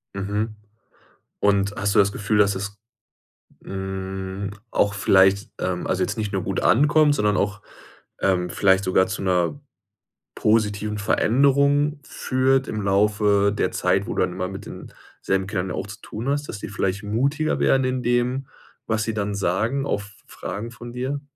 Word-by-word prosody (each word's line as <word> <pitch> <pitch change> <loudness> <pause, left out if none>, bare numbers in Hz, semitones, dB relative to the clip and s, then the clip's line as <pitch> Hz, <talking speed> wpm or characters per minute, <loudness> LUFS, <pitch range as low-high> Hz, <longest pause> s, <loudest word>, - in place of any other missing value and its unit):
Mhm. 105 +3 -2 0.8
Und, 100 0 +2
hast 100 +1 -1
du - - +6
das 100 0 +4
Gefühl, 105 +1 -1
dass 100 -1 +4
es, 100 +1 -5 0.9
hm, 95 0 -5 0.2
auch 100 0 +2
vielleicht, 100 +2 +3
ähm, 90 -1 -2
also - - +1
jetzt - - -3
nicht 105 -2 -2
nur 95 -2 -1
gut 95 0 -2
ankommt, 150 +3 +4
sondern 105 -4 +1
auch, 105 0 -1 0.6
ähm, 90 -2 +1
vielleicht 95 +2 +3
sogar 95 0 +3
zu 105 - -4
'ner 90 +6 0 0.8
positiven 105 -1 +1
Veränderung 140 +7 +2
führt 130 0 +1
im 110 - -3
Laufe 100 0 +2
der - - +1
Zeit, - - +1
wo - - -3
du - - +1
dann - - 0
immer 90 0 -3
mit 95 0 -8
den - - -10 0.3
selben 95 0 0
Kindern 95 -2 -2
ja - - -3
auch 95 - -4
zu 100 - -10
tun 115 +4 -6
hast, 145 +1 -1
dass 100 - -6
die - - -6
vielleicht 100 -1 -2
mutiger 140 +9 0
werden 135 0 +3
in 130 0 -1
dem, 125 +2 0 0.4
was 110 0 0
sie 115 - -2
dann 105 -1 -2
sagen 110 +9 0
auf 105 -5 -3 0.2
Fragen 105 +6 -6
von 120 -1 -10
dir? 130 +4 -3
105 Hz, 170 wpm, -23 LUFS, 95-120 Hz, 0.9 s, du